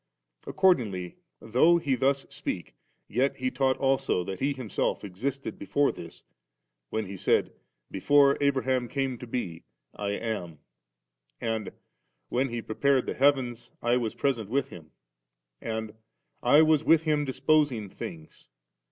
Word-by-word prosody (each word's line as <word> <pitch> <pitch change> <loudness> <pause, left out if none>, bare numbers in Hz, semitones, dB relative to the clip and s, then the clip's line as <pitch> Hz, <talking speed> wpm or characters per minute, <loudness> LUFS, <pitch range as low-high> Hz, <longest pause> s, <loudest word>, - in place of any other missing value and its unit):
Accordingly, 110 - +1 0.2
though 145 +10 +4
He 145 -5 0
thus 135 +2 +1
speaks, 140 - -4 0.4
yet 130 +5 +1
He 130 0 -2
taught 130 0 +1
also 135 -9 +1
that 95 +1 -6
He 140 +2 +1
Himself 125 -7 -2
existed 125 +9 -4
before 145 0 +1
this, - - -11 0.7
when 110 -1 -2
He 100 - -8
^d, 95 - +1 0.4
'Before 140 +7 +4
Abraham 130 -3 +1
came 135 -2 -2
to 125 - -8
be, 90 -9 -4 0.3
I 100 0 -3
am*;' 100 -8 -4 0.8
and 110 -2 -2
^ - - -8 0.6
when 130 +2 0
He 120 -1 -4
prepared 135 +3 +1
the - - -2
heavens, 125 -4 +1
I 120 +1 +2
was 115 -3 -2
present 120 -7 -1
with 140 +4 0
Him; 80 -3 -12 0.4
' - - -55
and 110 -1 -4 0.3
* - - -51
I 145 +6 +6
was 155 -1 +3
with 165 0 +4
Him 150 -2 +1
disposing 135 -4 +1
things*.' 80 -4 -9
125 Hz, 145 wpm, -28 LUFS, 110-140 Hz, 0.8 s, I